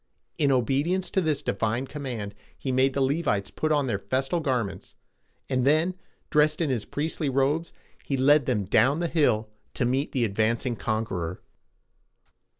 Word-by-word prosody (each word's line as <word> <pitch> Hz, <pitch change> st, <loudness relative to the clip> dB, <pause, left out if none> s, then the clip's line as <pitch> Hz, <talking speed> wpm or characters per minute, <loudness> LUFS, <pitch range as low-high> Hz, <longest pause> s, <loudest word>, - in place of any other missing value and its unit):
In 145 Hz, -2 st, +3 dB
obedience 140 Hz, +9 st, +1 dB
to 190 Hz, -, +2 dB
this 155 Hz, -4 st, 0 dB
divine 115 Hz, +5 st, -1 dB
command, 125 Hz, -8 st, -5 dB, 0.2 s
he 130 Hz, -, -3 dB
made 130 Hz, +1 st, +2 dB
the 140 Hz, -, +1 dB
Le´vites 135 Hz, -8 st, 0 dB
put 155 Hz, -, 0 dB
on 145 Hz, -2 st, +2 dB
their 105 Hz, -6 st, -1 dB
festal 130 Hz, -, -1 dB
garments, 125 Hz, -9 st, -2 dB, 0.5 s
and 130 Hz, -2 st, 0 dB
then, 155 Hz, +6 st, +3 dB, 0.4 s
dressed 150 Hz, 0 st, +3 dB
in 160 Hz, -5 st, +1 dB
his 120 Hz, -5 st, -1 dB
priestly 150 Hz, 0 st, -2 dB
robes, 140 Hz, +5 st, +1 dB, 0.3 s
he 135 Hz, -, -2 dB
led 145 Hz, +1 st, +4 dB
them 105 Hz, -6 st, 0 dB
down 130 Hz, -, +3 dB
the 175 Hz, -, 0 dB
hill 110 Hz, -10 st, +1 dB, 0.2 s
to 125 Hz, -, +1 dB
meet 130 Hz, +4 st, 0 dB
the 125 Hz, -4 st, +1 dB
advancing 115 Hz, +4 st, 0 dB
conqueror. 105 Hz, -7 st, -3 dB
135 Hz, 155 wpm, -26 LUFS, 115-150 Hz, 0.5 s, led